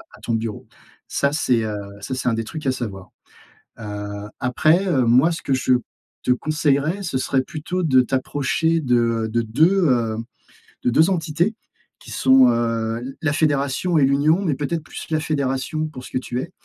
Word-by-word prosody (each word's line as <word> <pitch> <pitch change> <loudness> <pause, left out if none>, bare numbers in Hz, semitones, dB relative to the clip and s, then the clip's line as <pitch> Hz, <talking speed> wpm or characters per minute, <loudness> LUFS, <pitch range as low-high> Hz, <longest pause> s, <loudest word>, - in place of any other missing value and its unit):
à - - -18
ton 115 - -2
bureau. 110 -2 -3 0.4
Ça, 140 - 0
c'est, 125 -6 +1
heu, 105 -1 -3 0.3
ça 130 +6 -4
c'est 130 - -3
un - - 0
des 115 0 -1
trucs 155 +5 -7
à 130 - +3
savoir. 100 -7 -6 0.7
Heu, 105 -1 -6
après, 155 +9 +2
heu, 135 -9 +2
moi 130 +8 +5
ce 165 - -5
que 135 - 0
je 130 0 +1 0.5
te - - 0
conseillerais, 155 +5 0
ce 170 -8 -3
serait 130 0 +1
plutôt 160 +6 -4
de 135 -6 +4
t'approcher 145 +5 0
de 115 -4 +1
de 115 0 +1
2, 165 - +3
heu, 115 -4 +1 0.7
de - - +2
2 160 +8 +4
entités 175 +3 0 0.4
qui - - -12
sont, 130 -1 +5
heu, 115 -1 0
l 130 +3 -7
la 155 -3 +1
fédération 145 +2 +1
et 145 - +4
l'union, 145 +6 +3
mais 165 -6 +1
peut-être 150 +4 -3
plus - - -9
la 155 -1 +1
fédération 150 +1 -1
pour 130 -5 -10
ce - - -11
que - - -1
tu 125 -1 -3
es. - - -8
135 Hz, 185 wpm, -21 LUFS, 120-155 Hz, 0.7 s, moi